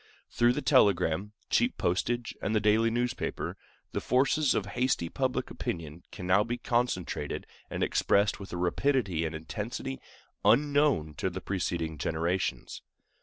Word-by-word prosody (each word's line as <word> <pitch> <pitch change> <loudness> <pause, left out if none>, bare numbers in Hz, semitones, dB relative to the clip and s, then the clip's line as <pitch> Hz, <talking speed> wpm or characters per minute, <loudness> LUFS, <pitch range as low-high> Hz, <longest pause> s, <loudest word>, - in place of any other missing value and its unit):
Through 120 +1 +3
the 150 - -3
telegram, 100 - +3 0.2
cheap 245 +1 +2
postage, 115 +7 -1
and 110 - -1
the - - +4
daily 110 +2 +3
newspaper, 120 +1 -2 0.4
the - - -2
forces 135 +3 +2
of 100 - 0
hasty 125 -9 +1
public - - -1
opinion 80 0 -5
can 90 - -7
now 95 +3 +4
be 120 +2 -3
concentrated 120 -8 -1 0.2
and - - -2
expressed 100 +1 +2
with 100 - -9
a 90 - -4
rapidity 90 - +1
and 80 0 -3
intensity 115 +10 -5 0.4
unknown 145 - +3
to 95 - 0
preceding 85 -5 -2
generations. 85 +5 -2
105 Hz, 135 wpm, -29 LUFS, 85-125 Hz, 0.4 s, the